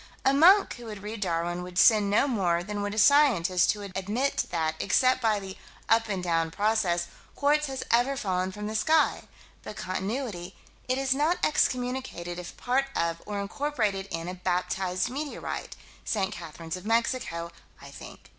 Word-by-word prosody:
A 270 Hz, -, +5 dB
monk 365 Hz, +6 st, +5 dB
who 240 Hz, -, -10 dB
would 210 Hz, -3 st, -8 dB
read 210 Hz, +1 st, -6 dB
Darwin 175 Hz, -1 st, -1 dB
would 180 Hz, 0 st, -8 dB
sin 210 Hz, -2 st, +5 dB
no 210 Hz, +7 st, +3 dB
more 180 Hz, -9 st, +1 dB
than 205 Hz, +2 st, -4 dB
would 205 Hz, +1 st, -3 dB
a -, -, -8 dB
scientist 205 Hz, -, +4 dB
who 210 Hz, -, -9 dB
would 200 Hz, -1 st, -7 dB
admit 215 Hz, +9 st, -1 dB
that, 160 Hz, -2 st, 0 dB
except 255 Hz, 0 st, +2 dB
by 220 Hz, -3 st, +2 dB
the 190 Hz, -1 st, -8 dB, 0.3 s
"up 225 Hz, -1 st, +3 dB
and 190 Hz, -3 st, -2 dB
down" 165 Hz, -2 st, +1 dB
process, 200 Hz, -3 st, +1 dB, 0.3 s
quartz 295 Hz, +1 st, +2 dB
has 265 Hz, -1 st, -4 dB
ever 245 Hz, +4 st, +3 dB
fallen 185 Hz, -5 st, -1 dB
from 210 Hz, +2 st, -7 dB
the 215 Hz, -, -4 dB
sky 310 Hz, +9 st, +2 dB, 0.4 s
but -, -, -8 dB
Continuity: 190 Hz, -1 st, -4 dB, 0.3 s
it 255 Hz, +1 st, 0 dB
is 270 Hz, -1 st, +2 dB
not 305 Hz, +6 st, +1 dB
excommunicated 250 Hz, -, -1 dB
if 175 Hz, -, -9 dB
part 260 Hz, +2 st, +1 dB
of 170 Hz, 0 st, -1 dB
or 205 Hz, -1 st, -3 dB
incorporated 210 Hz, -3 st, -2 dB
in 165 Hz, 0 st, -4 dB
a 180 Hz, -, -4 dB
baptized 180 Hz, +1 st, -1 dB
meteorite 285 Hz, +2 st, -5 dB, 0.3 s
St. 200 Hz, -2 st, -1 dB
Catherine's 165 Hz, -2 st, -7 dB
of 185 Hz, -, -9 dB
Mexico, 225 Hz, -7 st, -1 dB, 0.3 s
I -, -, -12 dB
think. -, -, -11 dB
205 Hz, 175 wpm, -27 LUFS, 180-255 Hz, 0.4 s, A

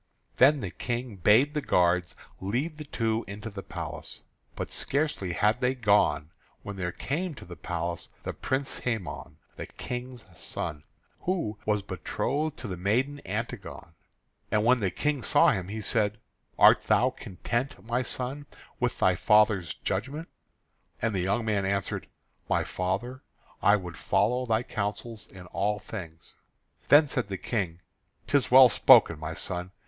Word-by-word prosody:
Then 140 Hz, +2 st, +6 dB
the 95 Hz, -, -4 dB
King 120 Hz, -3 st, -4 dB
bade 110 Hz, -, +4 dB
the 150 Hz, -, -1 dB
guards 90 Hz, -5 st, +2 dB, 0.2 s
lead 130 Hz, -, -2 dB
the 150 Hz, -, -7 dB
two 115 Hz, -4 st, -1 dB
into 105 Hz, +3 st, -7 dB
the 100 Hz, -1 st, -6 dB
palace. -, -, -7 dB, 0.3 s
But -, -, -5 dB
scarcely 140 Hz, -, -1 dB
had 105 Hz, +7 st, +2 dB
they 125 Hz, +1 st, +2 dB
gone 100 Hz, -, +2 dB, 0.3 s
when 100 Hz, -, -6 dB
there 90 Hz, -2 st, -2 dB
came 160 Hz, -, -3 dB
to -, -, -11 dB
the 90 Hz, -, -9 dB
place 85 Hz, 0 st, -4 dB
the -, -, -4 dB
Prince 135 Hz, +1 st, -2 dB
Hæmon, 115 Hz, -7 st, -4 dB, 0.2 s
the -, -, -6 dB
King's 125 Hz, -1 st, -7 dB
son, 75 Hz, -1 st, -5 dB, 0.3 s
who 165 Hz, -, -2 dB
was 105 Hz, -2 st, +1 dB
betrothed 135 Hz, -, -2 dB
to 115 Hz, -, -6 dB
the 90 Hz, -3 st, -5 dB
maiden 125 Hz, +10 st, 0 dB
Antigone. 100 Hz, -6 st, -5 dB, 0.6 s
And 105 Hz, 0 st, +1 dB
when 125 Hz, +1 st, +5 dB
the 100 Hz, -4 st, +1 dB
King 150 Hz, +6 st, -1 dB
saw -, -, +5 dB
him, 95 Hz, -4 st, -1 dB
he 110 Hz, +2 st, -5 dB
said: 105 Hz, -1 st, +1 dB, 0.4 s
"Art -, -, +7 dB
thou -, -, +3 dB
content, 115 Hz, +3 st, -4 dB
my 120 Hz, +2 st, 0 dB
son, 130 Hz, +3 st, -3 dB, 0.3 s
with 125 Hz, -1 st, 0 dB
thy 95 Hz, -, +4 dB
father's 100 Hz, -3 st, +3 dB
judgment?" 135 Hz, -, -3 dB, 0.7 s
And 115 Hz, -1 st, 0 dB
the 95 Hz, -, 0 dB
young 100 Hz, +6 st, 0 dB
man 105 Hz, -3 st, +1 dB
answered: 100 Hz, 0 st, -2 dB, 0.4 s
"My -, -, +2 dB
father, 100 Hz, +8 st, -3 dB, 0.4 s
I 100 Hz, -, +6 dB
would 90 Hz, -5 st, -6 dB
follow 125 Hz, +2 st, +1 dB
thy 110 Hz, +1 st, +2 dB
counsels 110 Hz, +1 st, -4 dB
in 90 Hz, -2 st, -12 dB
all 105 Hz, +1 st, 0 dB
things." 85 Hz, -5 st, -9 dB, 0.5 s
Then 150 Hz, +1 st, +7 dB
said 125 Hz, -5 st, -2 dB
the 95 Hz, -1 st, -4 dB
King: 90 Hz, -8 st, -3 dB, 0.4 s
"'Tis 140 Hz, -2 st, +2 dB
well 130 Hz, 0 st, +9 dB
spoken, 85 Hz, -7 st, +6 dB
my 80 Hz, +1 st, -5 dB
son. 90 Hz, +1 st, -3 dB
105 Hz, 155 wpm, -28 LUFS, 95-125 Hz, 0.7 s, well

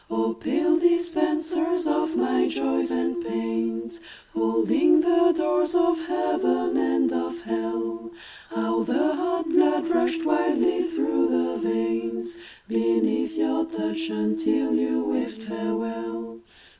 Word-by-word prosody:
Oh, 115 Hz, 0 st, 0 dB
pale 330 Hz, -, +1 dB
dispensers 340 Hz, 0 st, +1 dB
of 320 Hz, +1 st, 0 dB
my -, -, +2 dB
Joys 90 Hz, -1 st, -1 dB
and 85 Hz, +6 st, -1 dB
Pains, 115 Hz, 0 st, -3 dB, 0.3 s
Holding 115 Hz, -, +3 dB
the 345 Hz, +1 st, +4 dB
doors 335 Hz, +1 st, 0 dB
of 345 Hz, -1 st, +3 dB
Heaven 90 Hz, -, 0 dB
and 85 Hz, -1 st, +1 dB
of 85 Hz, +6 st, -3 dB
Hell, 115 Hz, 0 st, -3 dB, 0.4 s
How 115 Hz, 0 st, -1 dB
the 310 Hz, -, +1 dB
hot 345 Hz, +1 st, -1 dB
blood 330 Hz, -1 st, +3 dB
rushed 340 Hz, -1 st, +1 dB
wildly 320 Hz, +3 st, +2 dB
through 330 Hz, -, 0 dB
the 85 Hz, 0 st, 0 dB
veins 115 Hz, +1 st, -2 dB, 0.3 s
Beneath 115 Hz, -, 0 dB
your 320 Hz, -1 st, +1 dB
touch, 110 Hz, -, -3 dB
until 110 Hz, -1 st, 0 dB
you 80 Hz, -6 st, +1 dB
waved 225 Hz, -, -3 dB
farewell. 115 Hz, -, -5 dB
115 Hz, 115 wpm, -24 LUFS, -, 0.4 s, the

